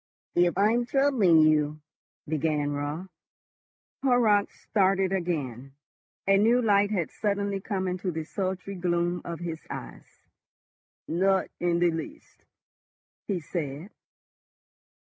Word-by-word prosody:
"If 175 0 +2
I 205 +2 +4
am 240 +1 0
troubling 245 - +4
you—" 155 -1 +2 0.5
began 150 -1 0
Raut. 145 +5 -4 0.9
Horrocks 235 -6 +2
started 195 -2 +2
again. 140 -8 -3 0.5
A 195 0 +5
new 230 +5 +4
light 205 -3 +3
had 185 -6 -1
suddenly 200 -1 -1
come 190 -2 -2
into 185 +1 -2
the 160 -2 -3
sultry 190 +3 -4
gloom 175 -1 0
of 170 0 -6
his 165 -2 -5
eyes. 60 - -10 0.8
"Not 190 +3 +1
in 175 -1 +1
the 175 0 +3
least," 165 - -8 0.8
he 195 -4 -1
said. 155 +2 -5
180 Hz, 115 wpm, -27 LUFS, 160-200 Hz, 0.9 s, A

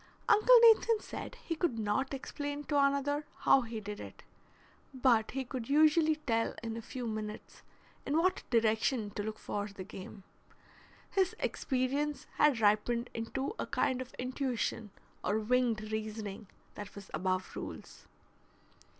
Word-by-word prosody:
Uncle 485 +4 +7
Nathan 455 -1 +6
said - - -7
he 335 - -1
could 315 -7 0
not 220 +5 0
explain 285 +2 -4
to 295 - -2
another 280 +1 +2 0.2
how 270 - +6
he 230 -2 -5
did 210 0 -7
it, - - -10 0.7
but 245 -4 +3
he 270 0 -3
could 245 -1 -5
usually 310 +2 +5
tell 230 -7 -1
in 225 -1 -3
a 230 - -5
few 245 +2 -6
minutes 215 -1 -6 0.4
in 290 - 0
what 370 +3 +2
direction 225 -1 +2
to 205 - -4
look 215 +1 -4
for 205 -1 -3
the 200 -2 -8
game. 195 0 -10 0.9
His 380 -2 +1
experience 280 +3 -1
had 285 -6 +4
ripened 220 +3 +2
into 265 - -3
a - - -2
kind 255 0 0
of 255 - -9
intuition 250 -3 -2 0.3
or 210 - +1
winged 220 -1 +1
reasoning 215 -1 -4 0.3
that 205 -1 -9
was 200 -1 -11
above 185 0 -1
rules. - - -8
240 Hz, 145 wpm, -32 LUFS, 215-285 Hz, 0.9 s, Uncle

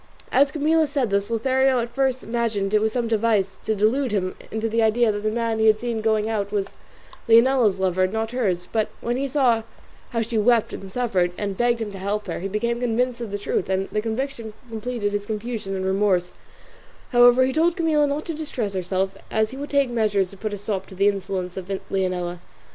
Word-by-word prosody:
As 275 +1 +4
Camilla 315 +1 +2
said 275 -6 -1
this 200 +1 0
Lothario 260 +3 +2
at 235 0 -2
first 265 0 0
imagined 225 -4 -1
it 210 - +4
was 220 0 +1
some 240 -1 -1
device 210 -4 +1
to 220 - +1
delude 230 +5 +1
him 185 -3 -1 0.2
into 220 +1 -2
the 230 +1 +1
idea 225 +1 +3
that 205 0 -4
the 215 - 0
man 230 0 -1
he 220 - +4
had 215 0 +5
seen 235 -2 -2
going 215 -1 +1
out 205 -3 -2
was 200 -2 -2 0.6
Leonela's 230 -3 +5
lover 185 0 +2
and 185 - -3
not 220 0 -2
hers; 190 -8 -1
but 220 -2 +1
when 240 +1 -1
he 275 +2 -1
saw 255 -5 +2 0.5
how 230 - -1
she 225 0 -1
wept 230 +1 +3
and 195 -1 -8
suffered, 190 -7 0
and 200 -2 -3
begged 240 +1 +1
him 210 - -6
to 195 - -8
help 205 +2 -2
her, 175 - -4
he 190 - -3
became 235 +4 -1
convinced 245 +1 0
of 230 - -4
the 205 - -3
truth, 200 -2 -2
and 190 0 0
the 210 - 0
conviction 230 0 -4 0.2
completed 225 -2 -3
his 205 0 -3
confusion 215 -2 -4
and 190 0 -3
remorse; 190 -2 +1 0.8
however, 245 +1 +6
he 260 - -1
told 335 +4 +2
Camilla 310 -3 +2
not 285 +2 -2
to 330 - -3
distress 260 -9 -4
herself, 190 +1 -1
as 220 0 +1
he 265 - -8
would 285 +1 -6
take 280 -3 +2
measures 205 -5 +1
to - - -11
put 215 +2 -4
a 205 - -4
stop 200 -1 -3
to 190 - -12
the 200 +2 +4
insolence 190 -2 -3
of 185 -1 -6 0.2
Leonela. 180 -2 -1
220 Hz, 220 wpm, -23 LUFS, 200-245 Hz, 0.8 s, however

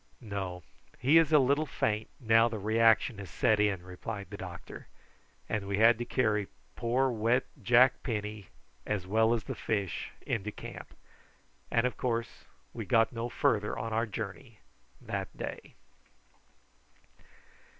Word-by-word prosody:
"No. 95 -4 -5 0.3
He 145 +6 +5
is 160 -2 +2
a 155 - +7
little 140 +3 +3
faint, 110 -4 -1
now 115 -2 +5
the 115 - -4
reaction 110 +1 +3
has 100 -3 -8
set 110 +3 +2
in," 100 -4 +1
replied 100 +2 -7
the - - -5
doctor; 90 -2 -9 0.6
and 105 -2 -2
we 100 0 -1
had 115 +1 +6
to 120 - -2
carry 105 -6 +1 0.3
poor 125 +3 +1
wet 115 +3 +1 0.2
Jack 120 +4 +5
Penny 105 -4 -4 0.4
as 105 -4 -2
well 110 +4 +3
as 115 -3 +1
the - - -5
fish 100 -7 -2 0.2
into 105 -1 -2
camp, - - -10 0.7
and 115 - +2
of 125 - -1
course 115 -2 -3 0.3
we - - -5
got 115 +2 +3
no 115 +1 -3
farther 105 -3 +1
on 115 0 -3
our 115 +1 +1
journey 110 +3 -7 0.4
that - - -5
day. - - -7
110 Hz, 145 wpm, -30 LUFS, 105-120 Hz, 0.7 s, a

